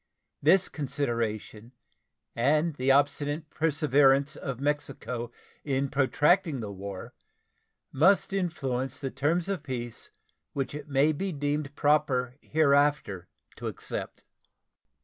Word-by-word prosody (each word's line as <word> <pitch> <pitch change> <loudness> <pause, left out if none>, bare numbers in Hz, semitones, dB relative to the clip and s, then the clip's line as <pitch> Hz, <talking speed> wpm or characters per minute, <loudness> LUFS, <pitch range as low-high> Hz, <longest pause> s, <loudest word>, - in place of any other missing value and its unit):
This 190 0 +4
consideration 120 -5 -3 0.6
and 150 +7 +2
the 130 +1 0
obstinate 145 +2 +1
perseverance 145 -2 +3
of 135 -4 -5
Mexico 135 -4 -3 0.3
in 135 -1 0
protracting 145 +3 +2
the 105 -3 -5
war 100 -1 -7 0.8
must 190 +7 +3
influence 135 -9 -2
the 135 -2 -4
terms 165 +6 0
of 195 -5 -2
peace 120 -5 -6 0.4
which 135 -1 -2
it 150 0 -7
may 140 +3 +3
be 190 +6 -3
deemed 145 -1 -2
proper 135 -5 +2
hereafter 145 - +2 0.3
to - - -5
accept. - - -6
140 Hz, 110 wpm, -28 LUFS, 130-150 Hz, 0.8 s, This